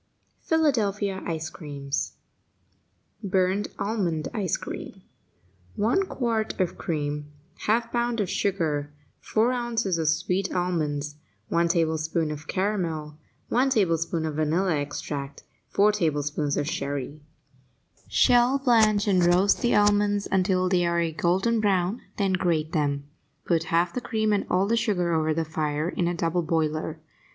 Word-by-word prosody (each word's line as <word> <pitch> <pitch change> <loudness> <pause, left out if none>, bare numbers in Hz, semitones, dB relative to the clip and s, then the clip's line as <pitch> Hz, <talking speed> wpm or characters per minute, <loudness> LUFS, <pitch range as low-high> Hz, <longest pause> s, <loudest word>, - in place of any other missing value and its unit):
PHILADELPHIA 210 -11 +1
ICE 160 -1 -3
CREAMS 140 -4 -4 1.1
BURNT 190 +1 +1
ALMOND 185 -8 -1
ICE 200 -7 0
CREAM - - -8 0.7
1 360 - +1
quart 230 -8 -2
of 185 -2 0
cream 150 -2 -3 0.3
1/2 230 +2 +1
pound 240 -1 0
of 205 - +1
sugar 160 -8 -1 0.3
4 225 +3 +1
ounces 235 -7 -1
of 160 - 0
sweet 180 +4 0
almonds 150 -5 -1 0.3
1 170 0 +2
tablespoonful 160 -1 0
of 150 +1 -10
caramel 165 -6 -2 0.3
1 255 +3 +3
teaspoonful 165 -7 +1
of 155 -1 -3
vanilla 160 +3 +1
extract 145 -1 -5 0.3
4 210 +1 +4
tablespoonfuls 150 -5 -1
of 145 - -1
sherry 145 0 -3 0.9
Shell, 240 - +4
blanch 220 -6 +3
and 185 -3 +3
roast 180 +3 +4
the 240 -2 +2
almonds 205 0 +3
until 185 -1 +2
they 180 -1 +2
are 170 0 +1
a 165 -1 0
golden 190 +8 +1
brown, 195 +1 +1 0.2
then 195 -2 +1
grate 165 -4 0
them. 145 -2 0 0.4
Put 165 -2 +1
half 170 +2 +1
the 250 - -3
cream 220 -3 0
and 200 - 0
all 185 +2 +2
the 225 +3 +1
sugar 180 -7 +1
over 155 -1 +1
the 165 0 0
fire 155 0 -1
in 175 -1 -1
a 175 - -1
double 170 +1 0
boiler. 155 -1 -1
175 Hz, 140 wpm, -26 LUFS, 155-205 Hz, 1.1 s, 4